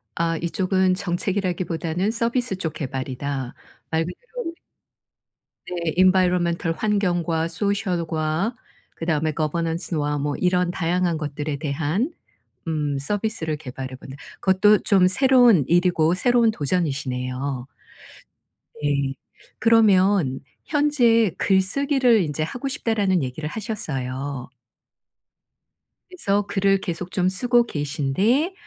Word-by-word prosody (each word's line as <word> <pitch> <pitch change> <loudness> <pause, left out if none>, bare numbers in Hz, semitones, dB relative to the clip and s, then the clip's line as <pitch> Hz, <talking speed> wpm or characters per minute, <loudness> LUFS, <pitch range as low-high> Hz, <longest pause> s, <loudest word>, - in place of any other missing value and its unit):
아 165 0 0
이쪽은 185 +2 +1
정책이라기보다는 180 -1 -1
서비스 235 -1 -1
쪽 160 -4 -4
개발이다. 135 -2 -4 0.3
말 160 0 0
그대로 180 - -8 0.3
우리 330 - -4 1.2
네. 170 -3 -2
Environmental 180 -2 +3
환경과 175 -5 0
Social과 175 0 -1 0.4
그다음에 160 -2 -1
Governance와 160 -1 -1
뭐 145 0 -2
이런 180 -1 +1
다양한 175 -1 0
것들에 150 -1 -4
대한 155 - -1 0.6
음 150 -3 -1
서비스를 200 -2 -2
개발해 130 -2 -7
보는 130 +1 -11 0.3
그것도 195 +2 +4
좀 190 -3 +4
새로운 245 - +5
일이고 175 -1 +3
새로운 240 +2 +3
도전이시네요. 135 - -2 1.1
네. 140 -2 0 0.5
그러면 195 - +4 0.3
현재 245 - +3
"글쓰기를 240 +5 +2
인제 155 0 -2
하고 245 - -4
싶다."라는 210 - 0
얘기를 140 +4 -4
하셨어요. 140 - -4 1.6
그래서 205 - 0
글을 195 -1 +2
계속 180 -1 -5
좀 185 -1 +1
쓰고 240 +5 +2
계신데 170 - 0
175 Hz, 300 characters per minute, -23 LUFS, 150-205 Hz, 1.6 s, 새로운